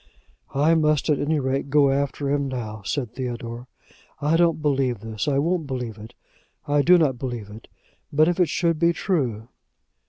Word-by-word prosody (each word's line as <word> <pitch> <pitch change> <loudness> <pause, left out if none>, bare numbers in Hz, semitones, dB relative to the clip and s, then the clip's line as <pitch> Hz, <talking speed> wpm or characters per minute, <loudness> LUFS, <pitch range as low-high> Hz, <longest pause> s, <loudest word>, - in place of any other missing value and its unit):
"I 150 +4 +4
must 155 -1 +2
at 145 - +1
any 150 +1 0
rate 135 +1 -2
go 140 -1 +4
after 140 +1 -1
him 140 -1 0
now," 110 -5 -5
said 125 +2 -3
Theodore. 120 -1 -5 0.5
"I 150 +3 +1
don't 165 -1 +3
believe 135 -7 0
this; 110 +1 -4
I 140 -2 +2
won't 165 +1 0
believe 125 -5 -5
it. 110 +3 -11 0.5
I 145 0 +3
do 180 +5 +6
not 140 -7 +1
believe 120 -6 -5
it. 110 +2 -12 0.4
But 155 +2 +4
if 175 +1 0
it 175 -4 +3
should 165 -1 0
be 170 0 +3
true 125 - -1
140 Hz, 180 wpm, -23 LUFS, 120-155 Hz, 0.5 s, do